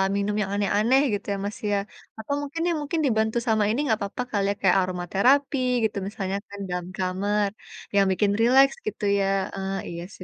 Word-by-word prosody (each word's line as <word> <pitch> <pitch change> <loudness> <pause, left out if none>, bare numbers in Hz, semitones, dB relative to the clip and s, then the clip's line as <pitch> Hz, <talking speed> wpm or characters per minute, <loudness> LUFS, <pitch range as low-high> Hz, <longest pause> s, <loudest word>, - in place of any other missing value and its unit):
minum 200 +1 0
yang 195 -1 -2
aneh-aneh, 210 +6 +3
gitu 205 - -3
ya, 200 - -3
Mas, 205 - -4
ya? 205 - +2 0.4
Atau 220 +6 -3
mungkin, 290 +3 -5
ya, 340 - +1
mungkin, 295 +3 -2
dibantu 220 -2 +1
sama 220 -2 +3
ini 225 +5 0
nggak 220 - +2
papa, 200 +5 -4
kali 200 -2 +1
ya, - - -3
kayak 190 - +4
aromaterapi, 195 - +1 0.3
gitu 215 -2 0
misalnya 195 -1 -3
kan, 200 0 -10
dalam 180 0 -3
kamar. 200 +2 0 0.5
Yang 200 -1 +5
bikin 200 +2 +2
rileks, 265 +4 +5
gitu 210 - -5 0.2
ya, 195 - +2 0.3
heeh. 195 0 -3
Iya 170 0 -6
sih, 185 - -11
205 Hz, 195 wpm, -25 LUFS, 195-230 Hz, 0.5 s, Yang